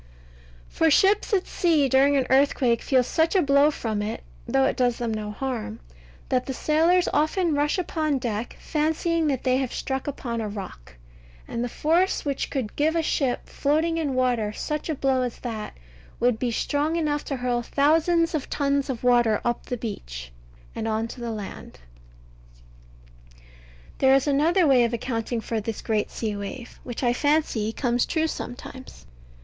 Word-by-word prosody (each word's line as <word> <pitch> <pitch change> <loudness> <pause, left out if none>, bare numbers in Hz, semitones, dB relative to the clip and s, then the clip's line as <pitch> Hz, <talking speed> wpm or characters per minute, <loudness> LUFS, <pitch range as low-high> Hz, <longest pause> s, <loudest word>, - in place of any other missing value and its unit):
For 325 - +2
ships 395 +9 +3
at 385 -3 +2
sea 320 -6 +2
during 275 +2 +4
an 265 - +1
earthquake 265 -3 +3
feel 260 -2 +3
such 320 +8 +1
a 380 - +5
blow 280 +1 +5
from 220 -8 -3
it 210 +1 -4 0.2
(though 135 - +2
it - - +1
does 245 -2 +1
them 235 -2 -2
no 215 -1 -4
harm) 225 - -4 0.5
that 255 -1 0
the 265 - -3
sailors 330 +6 +3
often 315 +3 +1
rush 290 +3 +1
upon 310 -5 0
deck 235 -2 -4
fancying 320 +1 0
that 270 -4 -1
they 255 -1 +2
have 260 -2 -2
struck 265 0 -3
upon 235 -5 -3
a 215 - -3
rock; 65 - -9 0.5
and 235 - -3
the 245 - -2
force 335 +9 +1
which 280 -2 -2
could 250 -7 -3
give 315 +3 +1
a 330 - +1
ship, 270 -5 -1
floating 320 +3 0
in 285 -5 -1
water, 245 -5 +1
such 300 +8 -4
a 315 - 0
blow 265 -1 +1
as 250 -2 -3
that, 220 - -5 0.4
would 240 -2 +2
be 250 - 0
strong 290 +7 0
enough 300 -3 0
to 275 - -3
hurl 245 -1 0
thousands 325 +6 +2
of 305 -4 -3
tons 280 0 0
of 250 -3 -4
water 240 -3 +4
up 240 0 -1
the 245 - -3
beach, - - -6 0.4
and 220 - -4
on 220 +1 -1
to 245 - -10
the 235 - -3
land. 210 -3 -7 1.5
But - - -24 0.6
there 265 0 +5
is 270 - +2
another 315 +5 +3
way 265 -4 +5
of 235 0 0
accounting 230 0 -3
for 225 -1 -2
this 220 +1 -5
great 215 -2 0
sea 215 -3 -3
wave, 205 +5 -7
which 245 +1 -6
I 240 -1 +3
fancy 290 -6 +1
comes 240 0 0
true 320 -1 +1
sometimes. 260 - -7
260 Hz, 175 wpm, -25 LUFS, 230-300 Hz, 1.5 s, a